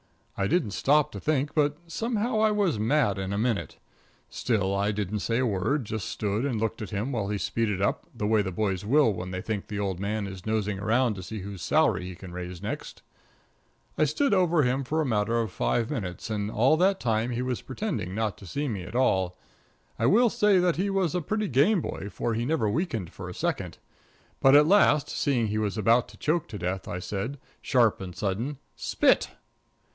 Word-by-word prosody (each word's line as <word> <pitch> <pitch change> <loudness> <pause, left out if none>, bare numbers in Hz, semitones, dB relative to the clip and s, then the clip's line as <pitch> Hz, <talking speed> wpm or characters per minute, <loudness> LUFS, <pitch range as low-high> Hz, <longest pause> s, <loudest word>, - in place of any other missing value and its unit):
I 100 - 0
didn't 150 - +1
stop 150 +7 +2
to 100 - -6
think, 145 +3 0
but 145 -1 +2
somehow 225 +5 -1
I 220 0 +4
was 200 - +1
mad 115 -3 +2
in 95 0 -3
a 100 - -1
minute. 105 - -1 0.5
Still, 100 -5 0
I 100 +1 +1
didn't 105 0 -2
say 115 +5 0
a 130 - +2
word 115 +6 0
just 110 -2 -4
stood 105 +2 -1
and 130 -6 -1
looked 115 0 -2
at 105 - -5
him 105 +7 -2
while 110 -6 -1
he 105 - -1
speeded 105 -1 -1
up 100 - 0
the 105 - -3
way 110 0 +3
the 95 -2 -3
boys 95 0 -1
will 125 +1 +4
when 90 0 -5
they 90 0 -4
think 105 -3 -3
the 105 - -5
old 95 -3 -2
man 105 +1 -2
is 95 -2 -8
nosing 105 -2 -1
around 115 +3 +2
to 95 - -7
see 105 +3 -6
whose 100 -2 -7
salary 90 0 +2
he 90 - -7
can 95 0 -10
raise 90 0 -7
next. 105 - -6 1.0
I 155 - +5
stood 205 - +1
over 175 -5 +3
him 130 +2 +1
for 155 +5 -1
a - - 0
matter 115 -1 +1
of 110 -4 -2
five 115 +6 0
minutes, 105 -5 -4
and 105 -1 -1
all 125 +8 +3
the 190 +3 +4
time 115 - 0
he 125 0 -2
was 125 -2 -2
pretending 130 - -4
not 110 -2 -2
to 100 - -11
see 145 - -2
me 105 -7 -3
at 90 - -9
all. 95 -8 +2 0.6
I 115 - +3
will 230 - +5
say 210 -2 +4
that 180 -2 +2
he 195 +3 0
was 190 -4 +1
a 180 - 0
pretty 215 +6 -1
game 150 - +4
boy, 100 - -5
for 120 - -2
he 115 +2 -1
never 145 -5 +1
weakened 115 - -2
for - - -8
a - - -8
second. - - -2 0.6
But 135 +1 +6
at 150 +1 +8
last, 155 -5 +4
seeing 125 -5 0
he 105 +1 -1
was 105 0 -1
about 115 +3 +3
to 105 +1 -15
choke 155 +6 0
to 105 - -7
death, 90 +1 -3
I 90 - -3
said, 100 +9 -4 0.2
sharp 120 -7 +2
and 90 -2 -7
sudden 110 +8 -2 0.2
"Spit." - - +2
110 Hz, 215 wpm, -27 LUFS, 100-145 Hz, 1.0 s, at